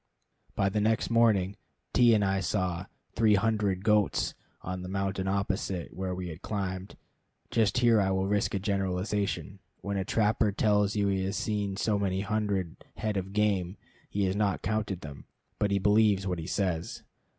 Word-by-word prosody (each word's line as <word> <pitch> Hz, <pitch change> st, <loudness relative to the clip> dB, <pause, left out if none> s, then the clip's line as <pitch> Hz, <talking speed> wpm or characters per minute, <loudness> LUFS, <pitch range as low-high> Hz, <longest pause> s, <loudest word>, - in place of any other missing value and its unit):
By 95 Hz, -, +2 dB
ten 105 Hz, +2 st, 0 dB
next 110 Hz, +3 st, +1 dB
morning 105 Hz, -5 st, +3 dB, 0.4 s
T 120 Hz, -2 st, +6 dB
and 105 Hz, -2 st, +2 dB
I 95 Hz, 0 st, +1 dB
saw 90 Hz, -1 st, -1 dB, 0.3 s
"three 110 Hz, -2 st, +4 dB
hundred" 100 Hz, -3 st, +1 dB
goats 105 Hz, -2 st, +2 dB, 0.3 s
on 90 Hz, 0 st, -4 dB
the 90 Hz, -, -6 dB
mountain 95 Hz, 0 st, -2 dB
opposite 95 Hz, -2 st, -2 dB
where 95 Hz, -1 st, -3 dB
we 90 Hz, -1 st, -5 dB
had 80 Hz, +3 st, -9 dB
climbed. 95 Hz, -2 st, -4 dB, 0.5 s
Just 115 Hz, +1 st, +2 dB
here 120 Hz, -3 st, +5 dB
I 95 Hz, -, +1 dB
will 95 Hz, 0 st, +1 dB
risk 105 Hz, 0 st, 0 dB
a -, -, 0 dB
generalization. 100 Hz, 0 st, -2 dB, 0.2 s
When 100 Hz, 0 st, -3 dB
a 95 Hz, -, 0 dB
trapper 105 Hz, +1 st, +2 dB
tells 105 Hz, -1 st, +2 dB
you 100 Hz, -1 st, +2 dB
he 95 Hz, -1 st, 0 dB
has 100 Hz, +2 st, -2 dB
seen 100 Hz, -2 st, -2 dB
so 105 Hz, -1 st, +1 dB
many 95 Hz, -1 st, 0 dB
hundred 100 Hz, -4 st, -2 dB
head 110 Hz, -1 st, -2 dB
of 95 Hz, 0 st, -3 dB
game, 100 Hz, -3 st, 0 dB, 0.3 s
he 100 Hz, -, -1 dB
has 95 Hz, 0 st, 0 dB
not 100 Hz, -2 st, 0 dB
counted 105 Hz, -4 st, -1 dB
them, 70 Hz, -2 st, -9 dB, 0.3 s
but 105 Hz, -, +2 dB
he 100 Hz, -, +2 dB
believes 105 Hz, 0 st, +3 dB
what 90 Hz, -3 st, -2 dB
he 80 Hz, -, -6 dB
says. 90 Hz, -4 st, -2 dB
100 Hz, 175 wpm, -29 LUFS, 95-105 Hz, 0.5 s, T